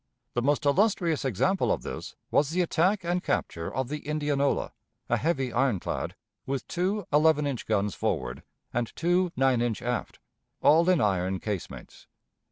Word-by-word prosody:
The 120 - 0
most 145 +3 +1
illustrious 170 -1 +2
example 140 - +1
of - - -1
this - - -6 0.2
was 145 -1 +3
the 180 +3 +1
attack 185 +4 +1
and 175 +1 0
capture 80 -1 -2
of 130 0 -2
the 150 +3 -4
Indianola, 145 -2 0 0.4
a - - +3
heavy 135 -7 0
ironclad, 120 -7 0 0.3
with 135 -1 -3
two 190 +3 -1
eleven 150 0 +4
inch 135 -4 -3
guns 105 -2 +1
forward, - - -2 0.3
and 120 -1 -1
two 175 +1 +2
nine 130 -2 +3
inch 120 -3 0
aft, 120 0 -2 0.4
all 165 +4 +5
in 180 -4 +4
iron 95 -2 +1
casemates. 100 -3 -6
145 Hz, 155 wpm, -28 LUFS, 120-170 Hz, 0.4 s, all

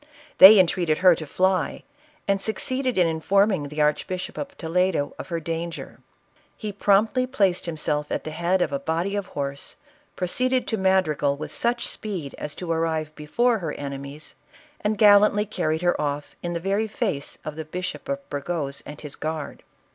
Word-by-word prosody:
They 205 +3 +11
en 185 - +7
treated 170 -3 0
her 185 -1 +6
to 155 -2 -6
fly, 185 -2 0 0.4
and 200 -1 +1
succeeded 255 +4 -1
in 180 - +5
informing 185 +1 +2
the 150 +1 -3
Archbishop 180 +5 -1
of 280 0 -6
Toledo 170 -2 0
of - - -6
her 170 -2 -2
danger. 165 +1 -5 0.6
He 215 -2 -4
promptly 210 +5 +2
placed 195 -9 +1
himself 150 -2 -2
at - - -2
the 155 - -5
head 175 +3 +1
of - - -3
a 140 - -1
body 165 +7 -1
of 200 -2 -3
horse, 140 -1 -5 0.4
pro 185 - -2
ceeded 255 +7 +1
to 220 - -1
Madrigal 180 -7 +2
with 150 - -6
such 240 0 0
speed 180 -10 -5
as 150 - -4
to 175 -2 -4
arrive 160 -2 -1
before 225 +11 +1
her 160 -5 -4
enemies, 140 +1 -7 0.5
and 210 0 0
gallantly 210 0 +6
carried 170 -5 -2
her 175 -3 +2
off. 145 0 -3
in 175 0 -3
the 170 - -2
Very 200 +5 0
face 200 - -3
of 155 - -5
the 160 - -5
Bishop 180 - -5
of 280 0 -3
Burgos 145 -1 -3
and 150 - -9
his 150 -2 -8
guard. 155 -1 -5
175 Hz, 180 wpm, -24 LUFS, 155-200 Hz, 0.6 s, They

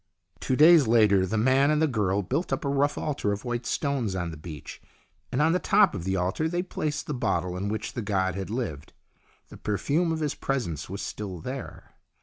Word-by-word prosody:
Two 130 - 0
days 155 -1 +7
later 105 -5 +4
the 110 - -1
man 130 +5 +4
and 150 0 +2
the 160 - +4
girl 105 -7 0
built 170 - -2
up 135 - -1
a - - 0
rough 140 +1 +1
altar 140 -9 -1
of 100 +3 -4
white 120 -1 -3
stones 135 -9 -1
on 90 -2 -2
the - - -7
beach, 75 -1 -9 0.5
and 140 +4 +2
on 160 - +4
the 180 - +2
top 200 +1 +4
of 85 - -5
the 95 0 0
altar 95 - 0
they 175 +1 -1
placed 155 -5 -3
the 150 - -3
bottle 90 -8 -1
in 100 +3 -3
which 110 0 -4
the 120 - -3
god 95 -3 0
had 95 +1 -5
lived. 105 - -4 0.6
The - - -11
perfume 145 - 0
of 160 - -1
his 150 -2 0
presence 105 - -3
was 100 +2 -5
still 100 -4 -5
there. 130 +9 -7
115 Hz, 215 wpm, -27 LUFS, 95-145 Hz, 0.6 s, days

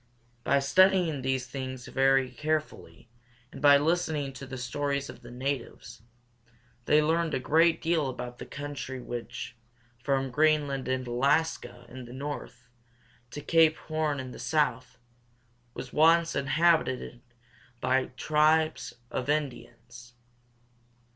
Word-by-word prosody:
By 140 - +3
studying 175 +1 +3
these 130 -1 -1
things 130 -1 -6
very 135 -1 +2
carefully, 155 -5 -4 0.4
and - - -10
by 145 -1 +7
listening 155 -2 0
to 135 +1 -9
the 130 0 -7
stories 140 +2 -2
of - - -16
the 120 - -12
natives, 125 -3 -5 0.8
they 150 0 +4
learned 165 0 +1
a - - 0
great 165 +5 +3
deal 160 -4 +1
about 125 -1 -7
the - - -8
country 145 -2 -6
which, 120 0 -6 0.5
from 135 0 0
Greenland 145 -2 +1
and 130 0 -1
A - - -5
las´ka 140 -1 0
in 125 +1 -10
the 120 - -11
north, 130 -3 -7 0.6
to 145 - -7
Cape 160 0 +4
Horn 155 -2 -2
in 130 -1 -6
the - - -10
south, 125 -5 -1 0.8
was 130 - -8
once 165 +2 +4
inhabited 140 -4 +1 0.6
by 130 +1 +1
tribes 155 -3 +2 0.2
of 130 - -3
Indians. 120 -5 -4
140 Hz, 130 wpm, -28 LUFS, 125-155 Hz, 0.8 s, by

